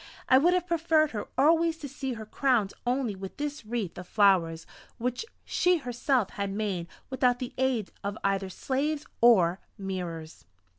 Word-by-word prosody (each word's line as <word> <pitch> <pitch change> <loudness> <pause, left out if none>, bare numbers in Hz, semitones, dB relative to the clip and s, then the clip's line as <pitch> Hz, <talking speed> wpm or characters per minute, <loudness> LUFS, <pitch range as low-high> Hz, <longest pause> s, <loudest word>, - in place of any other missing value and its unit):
I 260 - +7
would 350 +5 +4
have 360 -1 0
preferred 325 -3 +2 0.2
always 325 +3 +4
to 295 - -7
see 270 -1 -4
her 220 -2 -7
crowned 230 -3 +1
only 245 -4 0
with 190 0 -8
this 295 -2 -4
wreath 215 -6 -4
of 180 - -9
flowers 175 -6 +3 0.3
which 245 - -2 0.2
she 360 0 +2
herself 250 - 0
had 200 -1 -3
made 195 -4 -2 0.2
without 250 -2 +2
the 250 -1 -6
aid 255 -6 0
of 200 +1 -3
either 195 -1 0
slaves 285 +8 -2 0.2
or 190 -7 +5 0.2
mirrors. 175 -5 -6
240 Hz, 155 wpm, -28 LUFS, 195-280 Hz, 0.3 s, I